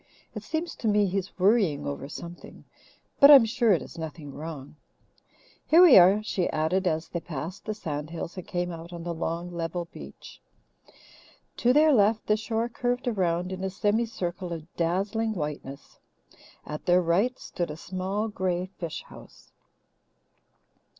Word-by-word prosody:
It - - -6
seems 330 +2 -4
to 225 - -3
me 210 -1 +3
he's 195 0 -3
worrying 190 -7 +2
over 140 -1 -5
something, 170 +3 -10 0.6
but 280 - +9
I'm 275 -5 +10
sure 235 0 +2
it 180 - +2
is - - -11
nothing 155 -3 -7
wrong. 150 -2 -8 0.9
Here 335 +3 +7
we 335 -8 +9
are," 195 +4 +5
she 190 -4 -1
added, 180 +5 0
as 160 0 -1
they 170 - -3
passed 165 +3 -7
the 215 - -3
sand 150 -6 -5
hills 165 0 -6
and 185 - -8
came 175 0 -2
out 165 +1 -9
on 170 -1 -7
the 170 0 -3
long, 170 +1 -4
level 170 0 -4
beach. 70 0 -12 1.2
To 245 - +3
their 300 +3 +5
left 215 -1 +3
the 210 - +3
shore 225 +2 -2
curved 245 +1 -2
around 180 -5 0
in 185 0 -5
a 190 - -1
semi 210 +4 0
circle 180 -4 -5
of 165 0 -8
dazzling 200 +6 0
whiteness; 150 -3 -6 0.7
at 150 0 -7
their 180 0 +4
right 195 +10 +1
stood 175 -2 -4
a 150 - -6
small 190 +5 -3
grey 185 -4 -2
fish 170 -4 -5
house. - - -16
180 Hz, 165 wpm, -27 LUFS, 165-215 Hz, 1.2 s, I'm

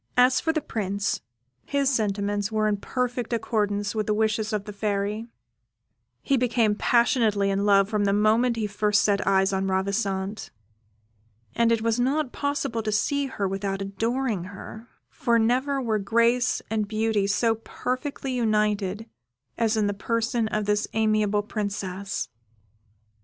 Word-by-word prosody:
As 250 +1 +5
for 320 - +1
the 315 -1 -1
Prince, 200 -5 -2 0.4
his 280 -1 0
sentiments 205 -4 0
were 215 -1 +1
in 210 -1 +1
perfect 245 +2 -2
accordance 205 -3 -1
with 215 -2 -2
the 210 - +1
wishes 220 0 0
of 210 -2 -2
the 210 - -7
Fairy: 205 +2 -2 1.0
he 275 - +2
became 235 -3 +2
passionately 220 -3 +2
in 200 +1 0
love 195 -1 +5
from 210 -1 0
the 200 - +2
moment 220 +4 +3
he 225 -2 -1
first 210 0 +1
set 200 -2 +1
eyes 195 0 +3
on 190 0 0
Ravissante; 195 +1 -1 1.0
and 230 - +2
it 225 -1 +1
was 230 +1 +1
not 270 +2 +1
possible 285 -5 -2
to 215 0 -2
see 280 +7 +1
her 205 -7 -2
without 195 0 -2
adoring 220 +1 -2
her, 210 +3 -10 0.2
for 235 -3 +1
never 255 +5 +1
were 225 -4 0
grace 235 +4 +2
and 215 -2 0
beauty 215 -1 0
so 225 +3 +2
perfectly 255 +4 -4
united 210 -3 0 0.5
as 225 -1 +1
in 215 - +2
the 205 - 0
person 230 +2 -1
of 215 -1 -1
this 210 +1 +1
amiable 215 -1 +2
princess. 200 -2 -4
215 Hz, 150 wpm, -25 LUFS, 200-235 Hz, 1.0 s, As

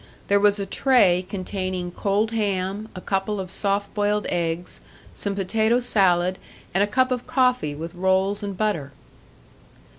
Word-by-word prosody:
There 200 0 +5
was 205 0 +4
a 200 - -2
tray 195 -6 +3
containing 185 -2 -3
cold 205 +4 0
ham, 205 -1 -2
a 185 - -6
couple 195 +2 -1
of 185 -1 -5
soft 200 +1 -1
boiled 210 0 0
eggs, 170 0 -2 0.3
some 200 -1 -3
potato 220 +4 +1
salad, 185 -6 +2 0.3
and 190 - +2
a - - +1
cup 255 +4 +2
of 250 -1 -2
coffee 250 - +1
with 165 +4 -6
rolls 190 +3 +1
and 200 -2 -5
butter. 165 -10 -1
200 Hz, 150 wpm, -23 LUFS, 185-210 Hz, 0.3 s, There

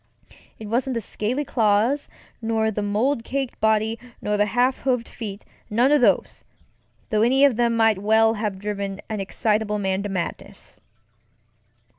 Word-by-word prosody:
It 220 - -9
wasn't 245 +4 -1
the - - 0
scaly 230 +6 -2
claws 225 +5 +1 0.3
nor 225 -1 0
the 210 - -3
mold 230 +5 0
caked 270 0 -3
body 220 +1 +1 0.2
nor 210 - -1
the 205 0 +2
half 245 +5 +1
hooved 250 -3 0
feetŌĆönone 225 +4 -2
of 295 - +4 0.2
these, - - -19 0.7
though 215 -1 +2
any 260 +4 +4
one 285 - +7
of 230 - -7
them 235 -1 +2
might 225 -3 +3
well 220 +2 +4
have 210 -3 -3
driven 200 -1 -4
an 215 -1 -3
excitable 210 +2 0
man 190 -1 -1
to 205 - -4
madness. 185 -3 -6
220 Hz, 155 wpm, -23 LUFS, 210-240 Hz, 0.7 s, one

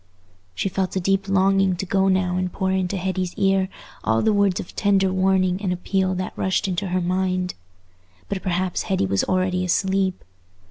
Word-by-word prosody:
She - - -1
felt 190 0 -2
a - - +2
deep 195 +2 0
longing 195 -1 +3
to 180 - -4
go 190 +1 +2
now 185 -1 +1
and 185 0 -1
pour 190 +1 -1
into 190 0 0
Hetty's 185 -1 -2
ear 195 -1 +2 0.3
all 110 +1 +1
the 220 - +3
words 200 -3 +2
of - - -8
tender 195 -2 +2
warning 185 0 +2
and 190 -3 -1
appeal 185 +1 0
that 185 0 -4
rushed 190 +2 0
into 190 +1 -2
her 185 0 0
mind. 185 0 -1 0.7
But 195 -2 -3
perhaps 180 0 -1
Hetty 190 - +1
was 95 0 +1
already 185 0 0
asleep. 190 +1 0
185 Hz, 180 wpm, -23 LUFS, 180-195 Hz, 0.7 s, longing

